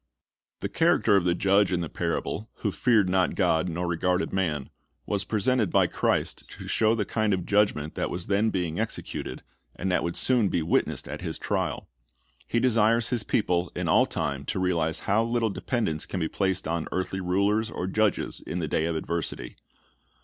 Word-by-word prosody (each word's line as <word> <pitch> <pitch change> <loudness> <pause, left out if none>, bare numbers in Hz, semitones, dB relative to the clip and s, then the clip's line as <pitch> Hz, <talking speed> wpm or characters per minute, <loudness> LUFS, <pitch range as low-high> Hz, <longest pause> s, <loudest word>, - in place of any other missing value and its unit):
The - - -1
character 105 - +3
of 95 -3 +3
the 85 -1 +2
judge 100 +1 +3
in 90 -1 0
the 85 - -2
parable, 105 +7 -3
who 105 - +1
feared 110 -3 +3
not 90 0 +1
God 80 +3 +2
nor 85 +2 -2
regarded 90 +2 0
man, 80 -8 -1 0.3
Was 100 -2 -1
presented 110 0 +1
by - - +4
Christ - - -1
to - - -9
show 110 0 +3
the 105 -3 -1
kind 110 -2 +1
of 90 - -5
judgment 100 -8 +1
that - - -2
was 90 0 -5
then 100 +3 +2
being 90 -5 -2
executed, - - -4 0.3
and 95 +1 -2
that 90 - +2
would 85 0 -3
soon 120 -6 +2
be 85 - 0
witnessed 80 - 0
at - - -6
His - - -4
trial. - - -2 0.6
He 120 - +1
desires 115 -1 +3
His 125 -3 0
people 90 -5 0
in - - -2
all - - +4
time 70 -1 -2
to - - -2
realize 85 -3 0
how 105 +3 +2
little 115 -1 0
dependence 100 -10 -2
can 95 - -3
be 80 - 0
placed 95 -2 -1
on 85 -1 -2
earthly 95 +1 -2
rulers 100 +5 +1
or 90 - -4
judges 105 +2 0
in - - -5
the 85 -3 -2
day 80 +2 0
of 85 0 -1
adversit}'. 80 -6 -3
95 Hz, 190 wpm, -27 LUFS, 85-110 Hz, 0.6 s, by